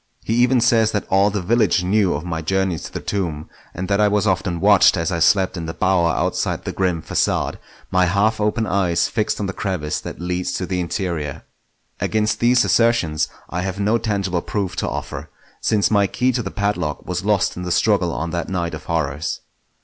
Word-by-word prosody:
He 110 - -1
even 125 +1 +3
says 115 -2 +3
that 105 - -1
all 95 +2 +4
the 105 -2 -3
village 105 -3 +2
knew 95 -1 +2
of 75 +4 -5
my 80 -2 -3
journeys 95 0 0
to - - -8
the - - -4
tomb, 85 -7 -3 0.2
and 90 +1 -5
that 100 +1 +2
I 105 - +5
was 105 0 +1
often 95 -3 0
watched 100 -1 +5
as 85 +1 -1
I 85 - -1
slept 95 +2 +3
in 80 -1 -5
the 80 - -5
bower 95 -2 +2
outside - - -1
the - - -2
grim 90 -4 -1
facade, - - 0 0.3
my 90 -1 +3
half 105 +4 +1
open 105 +2 +1
eyes 90 -3 +1
fixed 110 -2 -1
on 105 - -1
the 95 - -3
crevice 90 -8 -3
that - - -8
leads 90 +1 -2
to 95 - -2
the 90 0 -2
interior. 85 -5 -3 0.6
Against 110 -1 0
these 120 +1 +4
assertions 115 -10 +2 0.2
I 90 - -2
have 95 +1 -4
no 105 +3 +2
tangible 100 -6 -1
proof 100 -1 -3
to - - -1
offer, - - -6 0.3
since 105 -2 +2
my 100 -2 +4
key 125 +6 +1
to 125 - -1
the - - -4
padlock 100 -7 -2
was 90 0 -3
lost 105 -1 +1
in 90 - -6
the 90 0 -4
struggle 90 0 +2
on 80 +1 -3
that 85 -1 -3
night 85 -3 -2
of - - -7
horrors. 80 -1 -2
95 Hz, 210 wpm, -21 LUFS, 85-105 Hz, 0.6 s, I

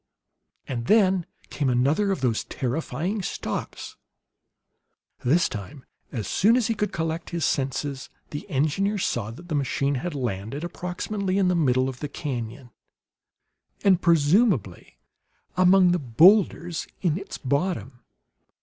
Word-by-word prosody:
And 120 -3 -4
then 190 -5 +4 0.2
came 140 -3 0
another 140 +11 +2
of 190 - -2
those 120 -4 +1
terrifying 160 - -3
stops. - - -5 1.3
This 155 +8 +3
time, 130 +5 -8 0.3
as 110 -5 -4
soon 225 +5 +4
as 245 - +1
he 230 - +1
could 210 -2 -2
collect 165 0 -3
his 170 -2 -1
senses, 135 0 -2 0.2
the 145 - -7
engineer 155 +9 0
saw 120 - -1
that 150 +10 -11
the 165 - -4
machine 140 0 0
had 175 -1 -4
landed 120 - -3
approximately 185 +3 -3
in 190 -2 +3
the 180 - +2
middle 130 -5 +2
of 130 -2 -6
the 150 - -4
canon, 125 -2 -5 1.1
and 190 -4 +4
presumably 160 - +2 0.6
among 185 0 +5
the 180 - +1
boulders 170 - +3 0.2
in 165 -5 +2
its 195 +2 -6
bottom. 140 - -2
155 Hz, 130 wpm, -25 LUFS, 130-185 Hz, 1.3 s, among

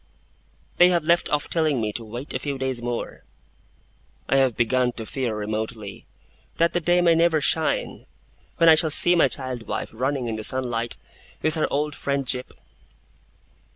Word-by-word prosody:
They 180 - +7
have 175 -3 +1
left 170 +2 +2
off 150 -1 0
telling 155 -5 0
me 105 -2 -2
to 115 - -5
'wait 120 +6 -8
a - - -2
few 140 -2 -4
days 130 -2 -2
more'. 120 0 -5 1.0
I 135 - +2
have 130 -4 +2
begun 125 +1 +1
to 115 - -7
fear, 125 -2 -3
remotely, 110 0 -5 0.5
that 170 +1 +2
the 175 - +1
day 175 +1 +2
may 170 -1 +4
never 165 -1 +3
shine, 155 +2 -1 0.5
when 165 - +4
I 165 - +9
shall 160 0 +2
see 175 +3 +5
my 170 - +4
child 130 -4 -3
wife - - -4
running 130 +2 -2
in 115 -2 -3
the 110 - -6
sunlight 120 -1 0 0.5
with 155 - +2
her 155 - 0
old 150 +1 -1
friend 140 -1 -2
Jip. 125 0 -2
135 Hz, 175 wpm, -23 LUFS, 120-160 Hz, 1.0 s, I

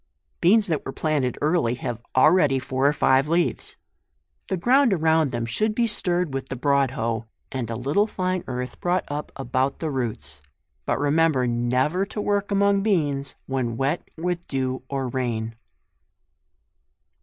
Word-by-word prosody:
BEANS 205 +5 +5
that 160 -6 -1
were 135 - -5
planted 140 -5 -1
early, 150 -7 +2
have 120 -2 -5
already 150 0 +5
four 130 +1 0
or - - +5
five 135 0 +3
leaves. 170 +1 0 0.7
The 190 - -1
ground 245 +4 +4
around 160 -4 +2
them 120 -2 -2
should 210 - 0
be 235 - +2
stirred 180 -7 0
with 135 0 -4
the - - -3
broad 140 +1 +2
hoe, 115 -2 -3 0.2
and 130 -4 -3
a 115 - -3
little 145 - +1
tine 185 -3 -2
earth 125 0 -5
brought 180 +1 +1
up 145 +1 -4
about 135 +1 -1
the 160 -2 -3
roots; 105 - -4 0.5
but - - +1
remember 145 -2 +2
never 125 +9 +1
to 210 - -6
work 205 -1 0
among 200 0 +3
beans 145 -10 0
when 125 -4 -2
wet 140 +6 0 0.2
with 175 +1 -3
dew 130 -1 -2
or 135 -2 -2
rain. 115 -3 -2
140 Hz, 155 wpm, -24 LUFS, 130-175 Hz, 0.7 s, BEANS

